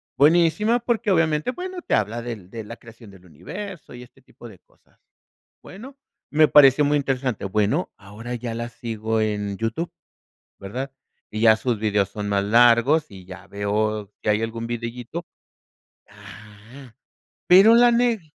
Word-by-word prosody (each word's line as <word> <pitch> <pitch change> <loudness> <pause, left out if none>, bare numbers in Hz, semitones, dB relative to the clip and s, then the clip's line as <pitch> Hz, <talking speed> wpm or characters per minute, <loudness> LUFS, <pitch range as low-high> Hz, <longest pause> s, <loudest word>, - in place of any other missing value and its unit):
buenísima, 170 - +3
porque, 235 -3 -2
obviamente, 160 +3 +1
bueno, 365 +4 -7
te - - -4
habla 110 +3 -1
del 110 -6 -8
de 115 -1 -7
la 115 +3 -10
creación 115 -2 -15
del 95 -1 -18
universo 160 - -9
y 125 - -10
este 125 - -20
tipo - - -15
de - - -14
cosas. - - -34 0.6
Bueno, 260 +9 -12 0.3
me 155 0 +4
pareció 145 0 +6
muy 145 +1 +2
interesante, 130 -6 -2
bueno, 105 - -1
ahora 110 +5 -8
ya 115 -1 -5
la 120 +1 -5
sigo 110 -2 -3
en 105 -2 -2
YouTube, 115 +10 -3 0.7
¿verdad? 125 +8 -6 0.4
Y 110 - -4
ya 110 -1 +6
sus 120 -3 -2
videos 105 -2 0
son 105 -1 -6
más 100 -1 +1
largos 120 +7 +4
y 95 -2 -12
ya 95 +1 -12
veo 105 0 -2
que - - -2
algún 115 +2 -1
videíto 120 +7 -6 0.8
ajá. 105 +5 -15 0.5
Pero 195 +6 +7
la 240 0 +6
neg 235 -3 +1
115 Hz, 155 wpm, -22 LUFS, 105-155 Hz, 0.8 s, Pero